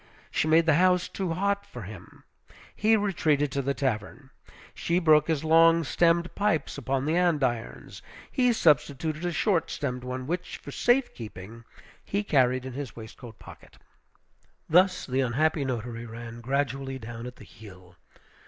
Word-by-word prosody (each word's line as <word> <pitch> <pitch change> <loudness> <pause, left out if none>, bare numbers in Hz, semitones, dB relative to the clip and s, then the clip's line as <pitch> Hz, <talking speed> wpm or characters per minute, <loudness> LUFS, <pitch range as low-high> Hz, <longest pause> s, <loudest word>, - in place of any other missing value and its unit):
She - - 0
made 160 +1 +4
the 160 - +4
house 180 -1 +3
too 185 -4 -3
hot 200 +3 0
for 125 - -10
him, 95 -2 -12 0.5
he 220 +1 +3
retreated 155 -8 +1
to 140 - -1
the 140 +1 -2
tavern; 130 +2 -3 0.4
she 170 - -1
broke 155 -4 +4
his 160 -3 0
long 165 +1 +5
stemmed 170 +3 +2
pipes 200 -8 0
upon 135 0 -2
the 155 +2 +1
andirons, 145 -10 -1 0.3
he 250 -2 +3
substituted 155 - +1
a - - -1
short 175 -1 +1
stemmed 125 -4 -4
one, 125 0 -5
which, 175 +5 -4
for - - -10
safe 245 +2 +2
keeping, 110 +1 -10 0.4
he 200 +2 -2
carried 130 -7 +2
in 130 - -6
his 140 -2 -6
waistcoat 110 0 -11
pocket. - - -15 0.9
Thus 185 +3 +3
the 130 0 0
unhappy 145 +4 +1
notary 120 -2 -4
ran 115 +1 -9
gradually 135 +1 -2
down 120 0 -8
at 125 - -9
the - - -14
heel. 90 -5 -15
140 Hz, 155 wpm, -27 LUFS, 125-170 Hz, 0.9 s, long